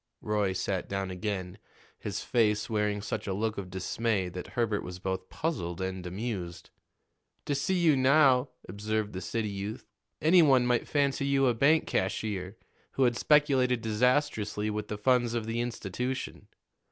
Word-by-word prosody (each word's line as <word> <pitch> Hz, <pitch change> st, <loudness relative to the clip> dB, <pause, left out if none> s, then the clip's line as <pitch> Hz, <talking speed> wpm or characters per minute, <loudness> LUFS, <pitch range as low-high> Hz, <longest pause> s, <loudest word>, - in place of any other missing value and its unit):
Roy 105 Hz, -3 st, 0 dB
sat 95 Hz, 0 st, -2 dB
down 95 Hz, -1 st, -2 dB
again, 95 Hz, -1 st, -4 dB, 0.4 s
his 100 Hz, -1 st, -4 dB
face 110 Hz, -2 st, +1 dB
wearing 105 Hz, -1 st, 0 dB
such 105 Hz, 0 st, -4 dB
a 95 Hz, -, -1 dB
look 110 Hz, +1 st, -1 dB
of 95 Hz, -2 st, -7 dB
dismay 95 Hz, +1 st, -1 dB
that 90 Hz, 0 st, -7 dB
Herbert 110 Hz, -4 st, +1 dB
was 90 Hz, 0 st, -7 dB
both 95 Hz, 0 st, -4 dB
puzzled 90 Hz, -, -3 dB
and 95 Hz, -1 st, -4 dB
amused. 95 Hz, -3 st, -5 dB, 0.7 s
"To 145 Hz, -, 0 dB
see 140 Hz, +7 st, 0 dB
you 165 Hz, -4 st, +4 dB
now," 130 Hz, -1 st, +4 dB, 0.2 s
observed 105 Hz, +2 st, -2 dB
the 95 Hz, -, -5 dB
city 110 Hz, +4 st, -2 dB
youth, 100 Hz, +3 st, -5 dB, 0.3 s
"any 175 Hz, +3 st, +6 dB
one 135 Hz, -5 st, +5 dB
might 125 Hz, -1 st, +1 dB
fancy 140 Hz, -1 st, +1 dB
you 135 Hz, -1 st, +3 dB
a 125 Hz, -, +3 dB
bank 145 Hz, +7 st, +3 dB
cashier 95 Hz, 0 st, -2 dB, 0.4 s
who 135 Hz, -, +2 dB
had 120 Hz, -2 st, +3 dB
speculated 130 Hz, -4 st, +3 dB
disastrously 110 Hz, -2 st, +1 dB
with 105 Hz, 0 st, -4 dB
the 105 Hz, -, -4 dB
funds 120 Hz, +1 st, +2 dB
of 115 Hz, -2 st, -2 dB
the 115 Hz, +1 st, -2 dB
institution. 120 Hz, +2 st, -4 dB
110 Hz, 160 wpm, -29 LUFS, 95-125 Hz, 0.7 s, any